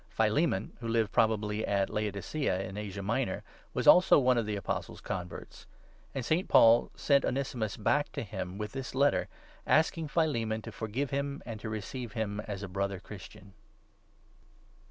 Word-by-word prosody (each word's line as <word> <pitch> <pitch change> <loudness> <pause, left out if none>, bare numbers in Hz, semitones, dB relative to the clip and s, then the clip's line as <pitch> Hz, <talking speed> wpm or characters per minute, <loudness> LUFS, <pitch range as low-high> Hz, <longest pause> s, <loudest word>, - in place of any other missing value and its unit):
Philemon, 110 - +1
who 115 - -5
lived 115 -2 +1
probably 110 -1 +1
at 100 -2 +1
Laodicea 105 +1 -1
in 95 - -8
Asia 100 -1 -5
Minor, 115 0 -1 0.3
was - - -1
also 180 +1 +8
one 130 -3 +4
of 115 -3 0
the 105 - -1
Apostle's 100 -4 -4
converts; 90 -1 -7 0.5
and 130 -3 -2
St. 165 +7 +1
Paul 115 +1 +6
sent 140 -1 +3
Onesimus 125 -6 -2
back 145 +7 +1
to - - -3
him 95 -3 -5
with 105 0 -4
this 135 -1 -6
Letter, 140 +2 +3 0.4
asking 160 0 +3
Philemon 115 -10 0
to - - -7
forgive 115 +6 -3
him, 140 0 -2
and 115 -3 -6
to 110 - -5
receive 110 +3 -5
him 105 -3 -2
as 100 -1 -5
a - - -4
Brother 100 0 -2
Christian. 100 -1 -12
110 Hz, 160 wpm, -30 LUFS, 100-135 Hz, 0.5 s, also